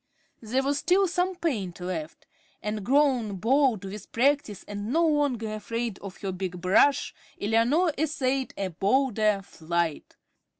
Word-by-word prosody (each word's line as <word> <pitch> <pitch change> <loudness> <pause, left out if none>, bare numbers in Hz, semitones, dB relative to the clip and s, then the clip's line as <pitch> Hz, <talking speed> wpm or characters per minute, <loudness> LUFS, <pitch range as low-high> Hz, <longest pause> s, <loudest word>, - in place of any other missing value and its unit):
There 245 +4 0
was 280 +1 0
still 385 +2 +3
some 360 +1 0
paint 220 - -2
left; 175 -3 -5 0.4
and 210 -1 -3
grown 255 -4 +2
bold 235 0 +2
with 195 +1 -8
practice 260 -4 +1
and 205 +2 -5
no 335 +4 +3
longer 270 -8 0
afraid 225 0 -4
of 195 -1 -9
her 195 - -2
big 180 -1 -4
brush, 195 +10 +3 0.3
Eleanor 240 - +2
essayed 270 -4 0
a 195 -1 -2
bolder 210 - +1
flight. 170 -2 -3
225 Hz, 135 wpm, -27 LUFS, 195-280 Hz, 0.4 s, still